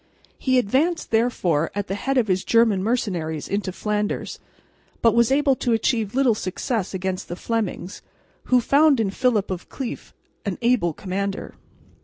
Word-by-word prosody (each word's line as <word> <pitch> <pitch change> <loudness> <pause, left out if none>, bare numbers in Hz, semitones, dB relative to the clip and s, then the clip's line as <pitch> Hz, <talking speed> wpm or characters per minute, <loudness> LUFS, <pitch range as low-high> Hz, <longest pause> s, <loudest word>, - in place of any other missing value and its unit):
He 260 -1 +2
advanced 275 - +1
therefore 190 -9 +1
at 205 -1 -1
the 195 - -4
head 270 +7 -1
of 240 -4 +3
his 185 -1 +1
German 230 -4 +3
mercenaries 180 -9 -2
into 200 -2 -2
Flanders, 210 +2 -2 0.6
but 230 - +5
was 235 +1 +3
able 275 -1 +3
to 240 - 0
achieve 225 -1 0
little 265 -3 +4
success 200 0 -3
against 190 0 -3
the 175 - -5
Flemings, 205 -3 -3 0.4
who 250 -1 +4
found 280 +1 +4
in 205 -4 +1
Philip 220 -4 +1
of 180 -1 -5
Cleef 265 -4 -6 0.3
an 200 -3 -3
able 230 -9 +2
commander. 195 +3 -4
215 Hz, 155 wpm, -23 LUFS, 190-250 Hz, 0.6 s, but